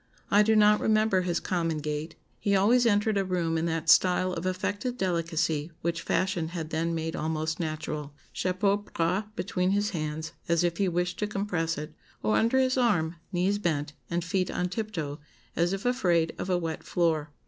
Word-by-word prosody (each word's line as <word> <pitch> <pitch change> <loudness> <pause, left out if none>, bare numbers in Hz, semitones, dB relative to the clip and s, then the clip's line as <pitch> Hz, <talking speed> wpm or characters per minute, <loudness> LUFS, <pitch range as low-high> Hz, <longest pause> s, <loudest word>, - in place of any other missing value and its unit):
I 205 - +6
do 220 +1 +4
not 210 0 +6
remember 215 -3 +3
his 175 -2 0
common 165 -3 -1
gait; 150 +2 -4 0.2
he 200 -1 +1
always 235 +5 +4
entered 205 -1 +2
a - - +1
room 175 -3 -1
in 165 +1 0
that 165 0 -2
style 185 +2 +4
of 180 +1 -3
affected 205 +6 -2
delicacy 165 -4 -1
which 165 0 -1
fashion 185 -3 0
had 165 -2 -5
then 165 +1 0
made 160 0 -3
almost 160 0 -2
natural 155 -2 -4 0.2
chapeau 190 +2 +1
bras 190 -1 -1
between 180 0 -1
his 205 +2 +1
hands, 155 -2 -3 0.2
as 170 0 +3
if 170 -1 0
he 195 - +2
wished 175 +1 -1
to 210 - 0
compress 180 -5 -1
it, 150 +1 -6 0.3
or 110 0 +2
under 230 +4 +3
his 260 0 +2
arm, 175 -9 +1
knees 190 +3 +1
bent, 150 -6 -1 0.2
and 170 0 -1
feet 185 +1 0
on 180 0 -1
tiptoe, 180 -8 -4 0.4
as 170 +1 +2
if 195 +2 -3
afraid 175 -10 +2
of - - -3
a 180 - +3
wet 165 -2 -3
floor. 160 -4 0
175 Hz, 185 wpm, -28 LUFS, 160-200 Hz, 0.4 s, I